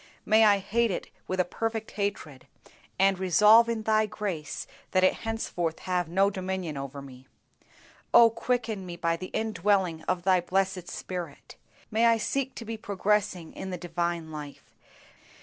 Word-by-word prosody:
May 220 0 +5
I 205 -1 +6
hate 225 +4 0
it 185 - -4 0.2
with 185 - -2
a 180 - +3
perfect 225 +3 -3
hatred, 200 -10 -4 0.5
and 195 -1 +3
resolve 210 +5 +6
in 225 -2 -2
Thy 215 0 +2
grace 190 -8 -4 0.2
that 185 -1 +2
it 185 - +5
henceforth 180 -7 -3
have 180 -3 -1
no 195 +3 +3
dominion 185 -4 -4
over 140 0 -6
me. 130 -1 -13 0.8
Oh 235 -1 +7
quicken 230 -3 -2
me 175 - -6
by 170 -1 0
the 185 +2 -7
indwelling 200 -6 0
of 180 -1 0
Thy 185 -1 +4
blessed 185 0 -1
Spirit. 175 -5 -7 0.4
May 225 +2 +4
I 230 0 +4
seek 265 +4 -2
to 230 - -7
be 225 0 -5
progressing 200 -4 -1
in 190 - -6
the 180 - -4
divine 170 -1 -3
life. 150 -2 -9
190 Hz, 160 wpm, -28 LUFS, 175-215 Hz, 0.8 s, Oh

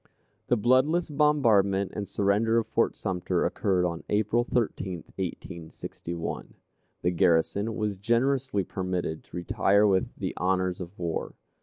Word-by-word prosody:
The 125 - +3
bloodless 130 +9 +3
bombardment 110 - +3
and 100 -1 -3
surrender 105 +4 +2
of 115 - +2
Fort - - +1
Sumter 90 -2 -1
occurred 90 -3 +1
on 85 -1 -3
April 110 +3 +2
13, 100 -8 -2
1861. 85 -2 -6 0.5
The 90 - +2
garrison 95 +5 +2
was 105 -2 -2
generously 120 +1 +1
permitted 90 -4 -3
to - - -9
retire 100 +4 +3
with 95 -2 +1
the - - -3
honors 95 0 0
of 90 +3 -8
war. 85 -2 -3
100 Hz, 130 wpm, -27 LUFS, 90-115 Hz, 0.5 s, The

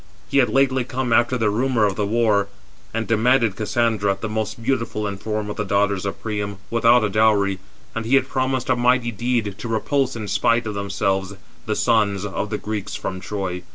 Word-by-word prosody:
423 - - -3
He - - +6
had 125 -4 +4
lately 135 0 +2
come 125 -1 -2
after 120 +2 +3
the 110 -3 +1
rumour 120 0 +2
of 100 -2 0
the 105 0 -1
war, 105 -2 +2 0.4
and 115 0 -2
demanded 115 0 +2
Cassandra, 105 -2 0
the 110 - -3
most 110 +1 -3
beautiful 115 -4 -1
in 100 -1 -3
form 105 +1 -3
of 105 - -5
the 105 - 0
daughters 100 -1 +1
of 100 - -5
Priam, 105 -2 -3
without 115 +1 +4
a 105 - +1
dowry; 100 -2 +2 0.3
and 115 - -3
he 120 +5 +2
had 135 - +3
promised 130 -1 -1
a - - +4
mighty 120 0 +2
deed, 115 -2 -1
to 120 - -5
repulse 130 +4 0
in 110 -2 -5
spite 115 +3 +2
of 110 - -3
themselves 100 -1 -1 0.3
the 110 - 0
sons 105 -4 +1
of 105 +1 -3
the 105 - -2
Greeks 105 -1 -4
from 95 -1 -4
Troy. 95 -2 -4
110 Hz, 205 wpm, -22 LUFS, 100-120 Hz, 0.4 s, He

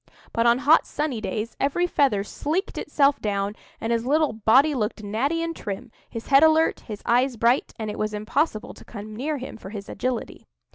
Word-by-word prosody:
But 230 +1 +2
on 235 +1 +5
hot, 295 +5 +4
sunny 290 -7 -2
days, 220 +1 -4
every 285 +6 +1
feather 270 - +2
sleeked 310 - -3
itself 285 -1 +2
down, 200 0 -1 0.2
and 225 +1 -1
his 230 0 0
little 295 +1 +2
body 255 +8 +4
looked 215 -3 -2
natty 270 +11 -1
and 330 0 -3
trim, 215 +4 -6 0.2
his 230 - -7
head 275 0 +7
alert, 320 0 +4
his 210 -3 -9
eyes 245 +1 +2
bright, 235 +4 +2
and 215 -2 -4
it - - -8
was 215 0 -1
impossible 215 +3 -1
to - - -15
come 215 -1 -9
near 290 +6 -2
him, 255 -3 -7
for 190 - -10
his 200 -1 -7
agility. 255 -2 -4
240 Hz, 195 wpm, -24 LUFS, 215-290 Hz, 0.2 s, head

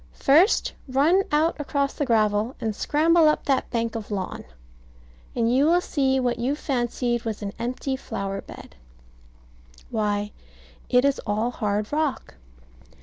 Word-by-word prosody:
First 325 - +3
run 290 +9 +3
out 310 +3 +2
across 280 -1 -1
the 290 - -2
gravel, 215 +1 +1
and 220 -3 -2
scramble 320 +4 +3
up 300 - -1
that 270 -2 +1
bank 230 -1 -1
of 220 -2 -5
lawn, 195 -3 -4 0.9
and 235 0 +1
you 280 +3 +4
will 345 +2 +4
see 270 -6 0
what 245 -2 -1
you 260 +4 0
fancied 240 -4 -1
was 220 -2 -4
an 200 0 -4
empty 255 +3 -2
flower 195 -6 -5
bed. - - -12 1.2
Why, 210 -2 -1 0.6
it 250 +1 +4
is 280 -1 +2
all 215 +4 0
hard 210 0 -2
rock. 300 -3 -1
250 Hz, 145 wpm, -24 LUFS, 220-285 Hz, 1.2 s, you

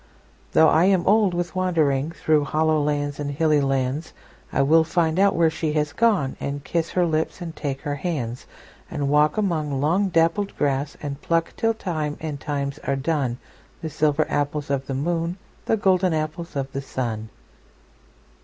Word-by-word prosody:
Though 160 - +6
I 165 +3 +4
am 190 -3 +3
old 205 -3 +4
with 175 0 -2
wanderingThrough 155 -4 +1
hollow 155 0 +2
lands 145 -1 -1
and 145 -1 -2
hilly 150 +1 +2
lands,I 135 +2 -2
will 160 +3 +5
find 165 +1 +1
out 200 0 +4
where 165 -1 +3
she 160 -1 -2
has 150 -1 0
gone, 200 -11 +2
And 140 0 -4
kiss 165 +1 -1
her 180 -1 +1
lips 160 +1 -1
and 165 -2 -6
take 140 -2 -4
her 145 -2 -3
hands; 140 -6 -4 0.4
And 140 -1 -2
walk 150 +3 +3
among 155 -9 0
long 175 +8 +2
dappled 165 +4 +1
grass, 140 0 -1
And 145 -1 -5
pluck 165 0 0
till 225 0 +1
time 155 -8 -3
and 155 -3 -5
times 140 -1 -3
are 140 - -1
done, 135 -3 -1 0.5
The 160 - -3
silver 150 +1 +2
apples 145 0 -1
of 135 -1 -1
the 135 - -3
moon, 170 +4 -1 0.3
The 225 - +2
golden 185 -3 +2
apples 155 +2 -4
of 135 -1 -3
the 135 - -3
sun. 115 -5 -4
155 Hz, 170 wpm, -23 LUFS, 140-170 Hz, 0.5 s, Though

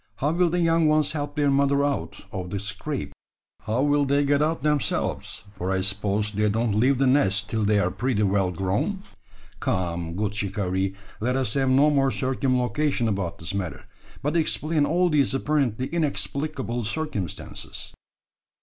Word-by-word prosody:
How 145 +3 0
will 175 +1 +2
the 175 +2 0
young 165 -1 +3
ones 155 -1 +3
help 145 -1 -4
their 145 -2 +2
mother 140 0 +3
out 140 -1 -3
of 90 -2 -5
the 100 - -3
scrape? 105 +8 -4 0.5
How 115 +5 0
will 145 0 +3
they 140 +1 +2
get 145 +1 +3
out 160 +2 0
themselves: 150 -2 -1
for 90 -1 -4
I 95 0 +1
suppose 100 +2 -1
they 105 +1 +1
don't 110 +1 0
leave 125 +6 +3
the 135 - +2
nest 110 -6 +2
till 110 -1 0
they 105 0 +3
are 90 -2 +1
pretty 110 +2 0
well 95 -1 +2
grown? 95 - -1 0.6
Come! 85 -4 -2
good 105 +1 -1
shikaree; 95 -2 -1 0.2
let 125 +4 0
us 130 -5 0
have 135 -1 +1
no 140 +3 +5
more 135 -2 +3
circumlocution 130 +2 0
about 100 -5 -2
the 80 +5 -5
matter, 85 -9 -4 0.4
but 145 +3 0
explain 155 -2 +1
all 180 +3 +3
these 145 -4 +2
apparently 135 -4 0
inexplicable 140 -5 -2
circumstances." 110 - -5
130 Hz, 165 wpm, -25 LUFS, 100-145 Hz, 0.6 s, no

